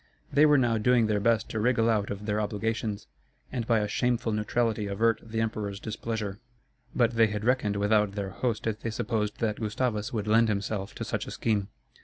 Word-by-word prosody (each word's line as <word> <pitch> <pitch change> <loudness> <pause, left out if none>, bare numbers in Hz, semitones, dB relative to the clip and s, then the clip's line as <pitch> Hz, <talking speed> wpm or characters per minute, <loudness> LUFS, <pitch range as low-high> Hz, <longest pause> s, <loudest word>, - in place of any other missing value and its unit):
They 150 +2 +6
were 150 -1 +5
now 120 -4 +2
doing 120 +1 +4
their 105 -1 +1
best 115 +2 +2
to 110 - -2
wriggle 115 0 +2
out 105 -3 +1
of 100 +1 -5
their 105 0 0
obligations, 105 0 -2 0.5
and 120 -3 -3
by 115 -2 +3
a 105 - -1
shameful 120 +1 0
neutrality 105 0 0
avert 110 +3 +1
the 115 0 -3
emperor's 105 -3 -3
displeasure. 110 -1 -4 0.6
But 120 -2 +3
they 115 -1 +4
had 105 0 -4
reckoned 120 -5 +2
without 105 0 +2
their 100 -1 -4
host 115 +2 -2
if 110 -1 -1
they 115 - -3
supposed 110 -2 -2
that 110 -2 0
Gustavus 110 +1 -1
would 110 -5 -2
lend 115 +2 +4
himself 100 0 -2
to - - -4
such - - -3
a - - -6
scheme. 105 -4 0
110 Hz, 200 wpm, -28 LUFS, 105-115 Hz, 0.6 s, They